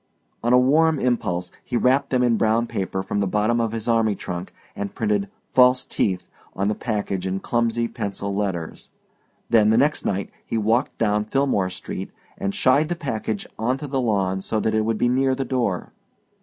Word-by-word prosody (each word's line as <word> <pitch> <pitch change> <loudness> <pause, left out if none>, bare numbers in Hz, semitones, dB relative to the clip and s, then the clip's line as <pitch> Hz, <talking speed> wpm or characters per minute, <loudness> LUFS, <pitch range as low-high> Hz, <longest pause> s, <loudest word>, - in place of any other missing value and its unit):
On 120 - +2
a 125 - +7
warm 155 +5 +4
impulse 90 -9 -1
he 125 - -2
wrapped 135 +3 +2
them 125 -1 +2
in 120 -2 +3
brown 110 +1 +2
paper 95 -3 -3
from 100 - -2
the 100 - +1
bottom 105 +4 +1
of 115 -2 0
his 115 0 -4
army 115 -3 +2
trunk, 90 -1 -6 0.2
and 100 -1 -5
printed 205 -2 0 0.2
FALSE 125 0 +5
TEETH 95 -3 -1 0.3
on 100 +2 0
the - - +1
package 100 -4 -2
in 95 +1 -1
clumsy 115 +1 0
pencil 100 -2 -4
letters. 95 -6 -3 0.6
Then, 110 -2 +5
the 110 - +4
next 145 +5 +2
night, 100 0 -2
he 115 - -3
walked 110 +4 +1
down 105 -1 +1
Philmore 120 -6 +1
Street, - - -6 0.3
and 100 0 -3
shied 145 +4 +3
the 175 - 0
package 110 -9 -3
onto 130 +6 -1
the 135 -2 -1
lawn 95 -5 0
so 110 +3 -1
that 110 - 0
it 110 0 +2
would 115 -1 0
be 120 - +2
near 130 +1 +2
the 135 0 -2
door. 120 -8 -1
115 Hz, 190 wpm, -23 LUFS, 100-125 Hz, 0.6 s, a